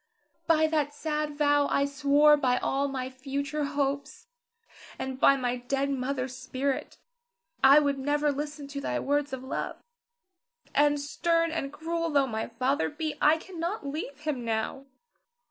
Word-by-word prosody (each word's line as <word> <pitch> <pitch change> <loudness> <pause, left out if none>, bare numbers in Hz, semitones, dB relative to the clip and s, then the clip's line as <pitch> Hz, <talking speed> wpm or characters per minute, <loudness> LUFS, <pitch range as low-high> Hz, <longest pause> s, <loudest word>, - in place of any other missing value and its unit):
By 315 -2 +4
that 300 -2 0
sad 300 -1 -2
vow 290 -1 +3
I 280 - +2
swore 285 +1 +5
by 255 -4 +1
all 275 +2 0
my 260 -2 -3
future 280 +3 -3
hopes, 280 +6 -2 0.7
and 265 0 -5
by 275 - +6
my 250 -2 -1
dead 275 +3 -1
mother's 260 -1 -2
spirit, 260 +2 -3 0.7
I 270 +2 +9
would 285 -2 +2
never 290 +2 +1
listen 290 0 -5
to 280 0 -5
thy - - -1
words 290 0 0
of 260 -1 -5
love. 260 - -4 1.0
And 290 0 +3
stern 330 +3 +1
and 275 -4 -3
cruel 330 +2 -2
tho' 285 -3 +3
my 220 -3 -3
father 260 +5 0
be, 310 0 -3
I 305 +2 +5
cannot 345 +1 -5
leave 285 0 -5
him 300 -5 -2
now. 230 +4 -2
285 Hz, 150 wpm, -28 LUFS, 270-300 Hz, 1.0 s, I